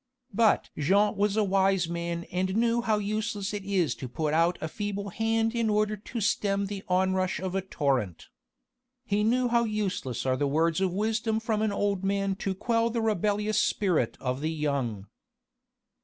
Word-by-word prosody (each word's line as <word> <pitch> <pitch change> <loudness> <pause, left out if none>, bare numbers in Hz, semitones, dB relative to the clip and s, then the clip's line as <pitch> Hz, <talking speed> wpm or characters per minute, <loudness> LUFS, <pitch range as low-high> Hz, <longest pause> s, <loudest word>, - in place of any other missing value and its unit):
But 220 0 +3
Jean 200 +8 +2
was 205 +1 +1
a 215 - +4
wise 195 -2 +2
man 170 0 -3
and 185 +1 -1
knew 235 +1 +2
how 220 -2 +1
useless 210 -1 -2
it 205 -1 -4
is 185 -9 +1
to 130 - -5
put 155 +3 -2
out 165 +2 +3
a 160 - -3
feeble 200 +3 -4
hand 225 +3 0
in 230 -2 0
order 210 0 +1
to 225 +3 -6
stem 200 -1 +1
the 195 0 -6
onrush 185 0 +1
of 185 -1 -4
a 195 - 0
torrent. 135 - -2 0.8
He 205 +1 +1
knew 245 +3 +2
how 235 0 +3
useless 200 - -2
are 130 -1 +1
the 145 - +1
words 160 +4 +1
of 190 -2 +1
wisdom 220 +3 0
from 220 -1 -1
an 215 -1 +1
old 200 -1 -1
man 195 0 0
to 190 -1 -2
quell 230 +3 +1
the 230 0 -2
rebellious 210 -1 +1
spirit 180 - +1
of 130 +1 -2
the 155 - 0
young. 140 -10 -2
195 Hz, 180 wpm, -28 LUFS, 170-215 Hz, 0.8 s, a